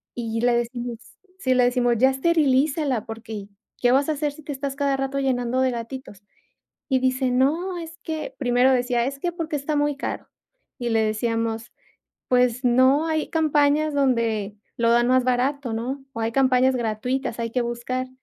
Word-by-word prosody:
y 230 -1 -3
le 245 0 +3
decimos 240 0 -2 0.4
Sí, 260 -5 +1
le 250 - +4
decimos: 245 -1 +2
"Ya 260 +4 +5
esterilízala 280 -3 +1
porque, 220 -2 -7 0.3
¿qué 245 - +4
vas 275 +2 +3
a 315 - +1
hacer 295 0 -1
si 305 +1 -14
te 295 - -6
estás 275 0 -4
cada 280 -1 +1
rato 270 +1 -2
llenando 255 -2 0
de 260 -1 +2
gatitos?", 235 -3 -7 0.7
y 260 -1 +3
dice: 260 0 +1
"No, 325 +9 +1
es 330 0 -9
que", 315 -1 -5
primero 250 0 +3
decía: 245 -1 +1
"Es 275 +1 -4
que 345 +4 -1
porque 325 -3 -3
está 290 +2 -2
muy 290 -1 +1
caro", - - -5 0.5
y 240 -1 -2
le 225 -1 +2
decíamos: 225 +1 -2 0.6
"Pues 250 0 +2
no, 260 +5 +4
hay 315 -1 -1
campañas 305 -1 +2
donde 230 -7 0 0.2
lo 230 0 +2
dan 240 +1 +4
más 255 -1 +3
barato, 255 +1 0
¿no?, 260 +5 -4
o 230 - -6
hay 225 +1 -1
campañas 260 0 +3
gratuitas, 240 +2 -2
hay 230 0 -2
que 245 +1 0
buscar", 245 +2 -3
255 Hz, 180 wpm, -23 LUFS, 235-280 Hz, 0.7 s, Ya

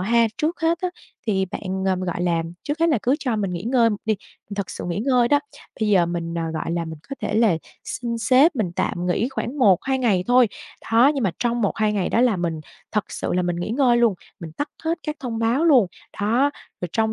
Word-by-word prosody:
ha, 230 +4 +3
trước 320 +3 -1
hết 330 +1 +2
á, 365 - 0 0.4
thì 195 -3 +1
bạn, 190 -1 -4
ờ, 190 -1 +2
gọi 175 -1 -3
là 170 -2 +1 0.2
trước 295 +2 -3
hết 335 - +4
là 290 -8 +3
cứ 255 +5 +3
cho 250 -6 -1
mình 200 -3 -1
nghỉ 175 - -4
ngơi 235 -1 +3
một 205 - -1
đi, 220 -1 +2 0.4
thật 200 - -3
sự - - -6
nghỉ 175 +3 -2
ngơi 245 0 +3
đó. 290 - +5 0.4
Bây 215 - +1
giờ 185 -5 +4
mình, 170 -1 -3
ờ, 165 - -1
gọi 155 - -3
là, 170 -1 -1
mình 160 -1 -7
có 275 - -4
thể 210 - -2
là 220 -7 +4 0.3
xin 235 -2 -3
sếp 260 +7 +4
mình 195 -7 0
tạm 175 +1 -1
nghỉ 210 +7 +1
khoảng 270 +1 -4
1-2 255 +4 +3
ngày 200 -8 +2
thôi, 245 -2 +5 0.4
đó. 245 +5 +6
Nhưng 265 -5 -1
mà 190 - +2
trong 240 0 0
1-2 210 +1 +1
ngày 195 -4 0
đó 230 - +2
là 245 -6 +3
mình 165 -3 -2 0.3
thật 210 - +1
sự - - -3
là 180 0 +1
mình 175 -1 -1
nghỉ 175 +5 -3
ngơi 245 -1 +3
luôn, 235 -4 +3 0.3
mình 160 -2 -8
tắt 290 - -3 0.2
hết 325 +1 0
các 300 0 -4
thông 235 -4 -4
báo 235 +8 +2
luôn, 260 - +6 0.3
đó. 240 +7 +2 0.3
Rồi 180 - -3
trong 220 -1 +1
225 Hz, 240 wpm, -23 LUFS, 185-255 Hz, 0.4 s, đó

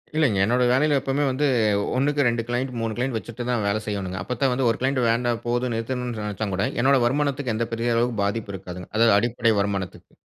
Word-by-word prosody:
இல்லைங்க. 140 -11 +2
என்னோட 125 +3 +2
வேலையில 145 +2 +3
எப்போவுமே 135 +2 -1
வந்து, 140 +3 +1 0.5
1க்கு 145 +2 +1
2 115 -1 0
கிளையன்ட் 125 +2 -2
3 115 -1 -2
கிளையன்ட் 125 -2 -1
வச்சுட்டு 120 +2 -7
தான் 120 -4 0
வேல 110 +2 0
செய்யணுங்க. 95 -3 -3
அப்ப 125 - -4
தான் 135 - +3
வந்து 125 -1 +1
ஒரு 115 - -1
கிளையன்ட் 130 0 +1
வேண்டாம் 120 0 0
போதும் 120 0 0
நிறுத்தணும்னு 120 0 -3
நினைச்சா 105 +1 -3
கூட. 100 - 0 0.2
என்னோட 135 0 +4
வருமானத்துக்கு 140 -1 0
எந்த 115 +1 -1
பெரிய 115 0 0
அளவுக்கு 115 -3 0
பாதிப்பும் 100 -1 -2
இருக்காதுங்க. 90 -1 -9
அதாவது 115 -2 +5
அடிப்படை 120 -1 +1
வருமானத்துக்கு. 100 -3 -3
120 Hz, 200 wpm, -24 LUFS, 110-130 Hz, 0.5 s, அதாவது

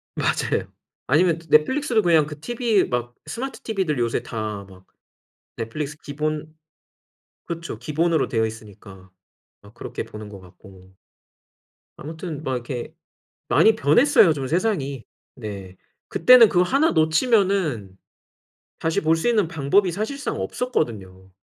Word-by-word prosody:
맞아요. - - -1 0.4
아니면 165 +4 +3
넷플릭스도 225 - +3
그냥 165 -4 +4
그 150 -1 -9
TV 235 -1 +1
막 120 -1 -3
스마트 265 +3 -6
TV들 190 - -1
요새 115 -1 0
다 105 -3 -5
막 95 -1 -17 0.7
넷플릭스 145 +6 -5
기본 155 +1 -4 0.9
그쵸 170 -9 -6
기본으로 160 +5 0
되어 115 -3 +1
있으니까 100 -4 -11 0.5
막 - - -17
그렇게 - - -6
보는 105 -1 -10
것 100 -2 -11
같고. 95 0 -17 1.0
아무튼 160 0 -7
막 130 -4 -2
이렇게 120 0 -5 0.5
많이 220 0 +5
변했어요 185 - +5
좀 135 -3 -4
세상이. 150 - -1 0.3
네. 100 -6 -8 0.3
그때는 235 +5 +7
그거 180 -2 +3
하나 275 - +2
놓치면은 160 - +1 0.9
다시 160 0 0
볼 160 +1 +2
수 165 - -1
있는 210 -8 +2
방법이 165 +5 +2
사실상 220 - -4
없었거든요. 95 - -3
155 Hz, 280 characters per minute, -23 LUFS, 115-190 Hz, 1.0 s, 그때는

